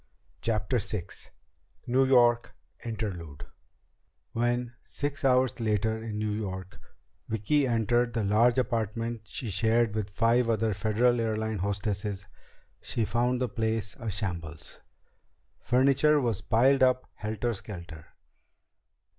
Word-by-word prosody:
CHAPTER 115 +2 0
VI 100 -4 -4 0.8
New 130 +2 +3
York 120 -2 +4 0.3
Interlude 95 -10 -5 0.9
When, 120 +1 -1
six 145 +1 -4
hours 130 -2 +3
later 110 0 0
in 110 -2 -5
New 105 0 -1
York, 95 -3 -5 0.5
Vicki 130 +7 +1
entered 120 +1 +1
the 115 - 0
large 115 +5 +3
apartment 115 -1 -1
she 110 +1 -4
shared 110 +2 +2
with 105 -2 -2
five 115 +4 +2
other 110 -1 +1
Federal 115 +4 +2
Airlines 110 -2 -1
hostesses, 100 0 -2 0.6
she 115 - -2
found 120 +3 +1
the 125 - 0
place 110 -3 -2
a 115 - -4
shambles. 85 -6 -5 0.8
Furniture 140 +4 +4
was 115 -7 -1
piled 130 +4 +3
up 130 0 +3
helter 110 +3 -2
skelter. 85 -6 -9
115 Hz, 115 wpm, -28 LUFS, 105-120 Hz, 0.9 s, York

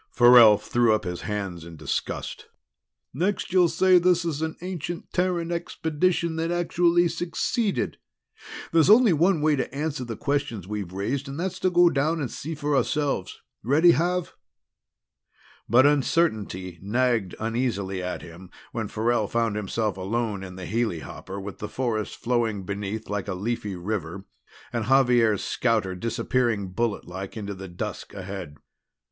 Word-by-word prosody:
Farrell 120 -3 +8
threw 110 +1 +2
up 110 - -3
his 90 -2 -4
hands 100 -5 -4
in 85 0 -10
disgust. 75 -2 -4 0.7
"Next 185 +6 -1
you'll 180 -2 +5
say 180 +3 +5
this 175 0 +2
is 155 -3 -2
an 160 0 -2
ancient 175 -2 -5
Terran 175 -2 0
expedition 170 0 -1
that 165 +1 -1
actually 175 0 +2
succeeded! 185 +6 -1 0.7
There's 165 +1 +4
only 220 -2 +7
one 165 +1 +3
way 155 0 +3
to 135 - -2
answer 145 0 -3
the 115 -3 -6
questions 140 -9 -2
we've 105 -4 -4
raised, 125 +9 -2
and 140 +3 -6
that's 185 +1 -3
to 185 - +2
go 175 -1 +5
down 155 +4 +1
and 135 -5 -3
see 160 +3 -5
for 145 -1 -1
ourselves. 140 -8 -1 0.2
Ready, 155 - +5
Xav?" 180 +2 0 1.4
But 130 +3 +6
uncertainty 110 - +1
nagged 115 -1 0
uneasily 110 -5 -2
at 90 0 -4
him 85 +2 -12 0.2
when 110 -2 -3
Farrell 110 0 0
found 115 -2 0
himself 105 0 -2
alone 105 +1 -2
in 90 -1 -8
the 95 -1 -7
helihopper 100 -3 -3
with 100 0 -8
the 105 - -5
forest 115 -5 -2
flowing 115 -4 -1
beneath 100 +3 -4
like 105 -1 -3
a 95 - -2
leafy 105 0 -3
river 95 0 -4 0.5
and 115 -2 -1
Xavier's 120 -5 +4
scouter 110 -6 0
disappearing 115 -1 -1
bulletlike 100 -2 -3
into 100 -2 -4
the 95 0 -8
dusk 85 +2 -6
ahead. 95 -5 -7
120 Hz, 150 wpm, -25 LUFS, 100-160 Hz, 1.4 s, Farrell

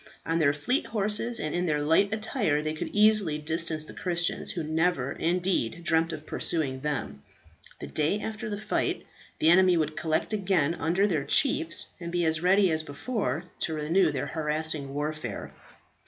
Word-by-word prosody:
On 165 +1 0
their 145 -3 +4
fleet 155 - -1
horses 215 +2 +1
and 155 - -3
in 175 +1 -1
their 150 -2 +1
light 160 +7 +3
attire 215 - 0
they 155 0 -2
could 155 - -4
easily 210 -7 +4
distance 160 0 +1
the - - -9
Christians, 175 -2 0
who 175 -6 -2
never, 155 -3 0
indeed, 175 -4 -1
dreamt 165 0 +1
of 155 -1 -7
pursuing 140 -7 -1
them. 135 - -4 0.6
The - - -6
day 155 +7 0
after 220 +1 -5
the 205 - -3
fight, 215 0 -2 0.3
the 160 - +4
enemy 185 0 +5
would 155 -1 -1
collect 160 +5 0
again 185 -7 +1
under 175 +3 0
their 165 -8 0
chiefs, 160 +3 +2
and 170 -1 -6
be 175 -1 0
as 160 0 +1
ready 190 +1 +4
as 160 0 +1
before 155 - -3 0.2
to 160 - -1
renew 160 +3 +2
their 135 -3 -3
harassing 155 -2 -2
warfare. 150 -6 -4
165 Hz, 170 wpm, -27 LUFS, 150-190 Hz, 0.6 s, enemy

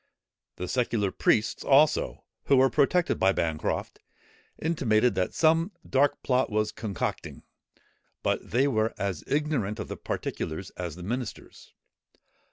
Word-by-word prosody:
The 90 - -5
secular 115 -4 0
priests, 110 +3 +1
also, 145 +2 +3 0.2
who 140 - +4
were 130 0 +5
protected 170 +7 +2
by 95 +1 +4
Bancroft, 80 -4 -2 0.6
intimated 125 -8 +2
that 90 - -1
some 165 +4 +3 0.2
dark 135 +2 +2
plot 130 0 +2
was 105 0 0
concocting; 105 -5 -4 0.8
but - - -1
they 130 +6 +2
were 110 -4 0
as 100 -5 -3
ignorant 140 -8 -1
of - - -5
the - - -5
particulars 80 +4 -4
as 85 -4 -6
the 90 - -9
ministers. 120 +5 -6
115 Hz, 130 wpm, -27 LUFS, 100-140 Hz, 0.8 s, were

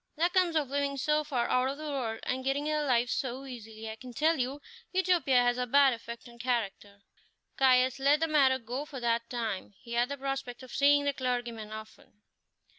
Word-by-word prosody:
That 340 +3 +1
comes 360 -3 +3
of 300 -3 +2
living 280 0 -1
so 300 +3 +1
far 265 -5 -1
out 255 +1 +2
of 275 - -4
the 305 -1 -5
world, 235 -5 -3
and 260 +1 -2
getting 270 +2 0
their 305 0 0
living 240 -2 +3
so 260 +2 -3
easily. 225 -3 -9
I 220 - -5
can 250 +1 -10
tell 315 +2 +2
you, 260 +3 -2 0.3
Utopia 350 -9 +3
has 245 0 +1
a 250 - -1
bad 275 +1 +5
effect 235 +1 -8
on 235 0 -15
character." 210 -5 -3 0.5
Caius 255 0 +4
let 285 +2 +4
the 325 - +1
matter 275 -4 +4
go 250 +3 -5
for 295 -3 -8
that 235 -1 0
time; 220 -5 -4
he 235 - -9
had 240 +2 +2
the 280 - -4
prospect 270 -2 -4
of 255 - -11
seeing 285 +1 +4
the 285 - +1
clergyman 240 -4 -3
often. 215 -1 -11
255 Hz, 205 wpm, -30 LUFS, 235-285 Hz, 0.5 s, bad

